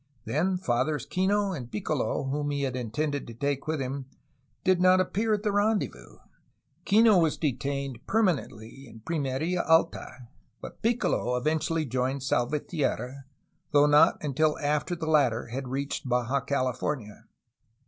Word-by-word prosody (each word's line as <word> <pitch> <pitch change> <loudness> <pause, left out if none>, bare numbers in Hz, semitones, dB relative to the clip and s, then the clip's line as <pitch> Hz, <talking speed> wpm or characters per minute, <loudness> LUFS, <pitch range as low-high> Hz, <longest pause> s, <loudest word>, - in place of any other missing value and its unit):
Then 170 - 0
Fathers 145 -2 -1
Kino 195 +5 +1
and 125 -9 -6
Piccolo, 110 +3 -1
whom 145 +2 -2
he 140 -1 -1
had 130 -2 -2
intended 140 +5 -2
to 115 - -9
take 140 +3 -2
with 155 -1 -1
him, 135 0 -4 0.6
did 185 -1 +3
not 185 0 +6
appear 210 +4 0
at 205 - -6
the 210 - +1
rendezvous; 205 +1 -1 0.7
Kino 215 -1 +5
was 160 -3 +1
detained 140 -3 -3
permanently 140 - -1
in 115 -1 -13
Pimerfa 160 +4 -1
Alta, 160 -6 +1 0.3
but - - -10
Piccolo 225 - +1
eventually 155 +4 0
joined 130 +1 -2
Salvatierra, 135 0 -1 0.4
though 145 0 +5
not 150 0 +5
until 150 +2 +1
after 150 +4 -1
the 165 -1 -5
latter 135 -8 +2
had 130 +2 -5
reached 135 0 -3
Baja 125 +2 +1
California. 130 -4 -3
145 Hz, 140 wpm, -27 LUFS, 130-165 Hz, 0.7 s, not